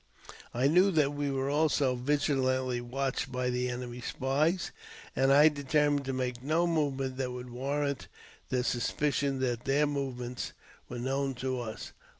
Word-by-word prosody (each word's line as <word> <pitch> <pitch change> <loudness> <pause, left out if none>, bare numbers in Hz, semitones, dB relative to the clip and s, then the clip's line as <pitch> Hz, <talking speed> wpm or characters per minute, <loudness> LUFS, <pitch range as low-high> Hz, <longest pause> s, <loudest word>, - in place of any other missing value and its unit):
I 125 +3 +2
knew 180 +6 +5
that 145 -3 +3
we 145 0 -1
were 135 0 -1
also 145 -3 +2
vigilantly 130 -2 +1
watched 130 +2 -2
by 125 0 -1
the 125 0 0
enemy's 125 0 -5
spies, 150 +7 0 0.4
and 135 +1 +3
I 145 +3 +8
determined 145 -1 +1
to 135 - -1
make 125 -2 -2
no 155 +6 +2
movement 135 -6 0
that 130 -2 -2
would 125 0 -7
warrant 140 +2 -2 0.4
the 125 -1 +1
suspicion 140 +3 0
that 120 -2 -1
their 140 +2 +3
movements 130 -4 -3 0.4
were 125 - -5
known 135 +2 -1
to 130 +1 -2
us. 110 -2 -6
135 Hz, 150 wpm, -30 LUFS, 125-145 Hz, 0.4 s, I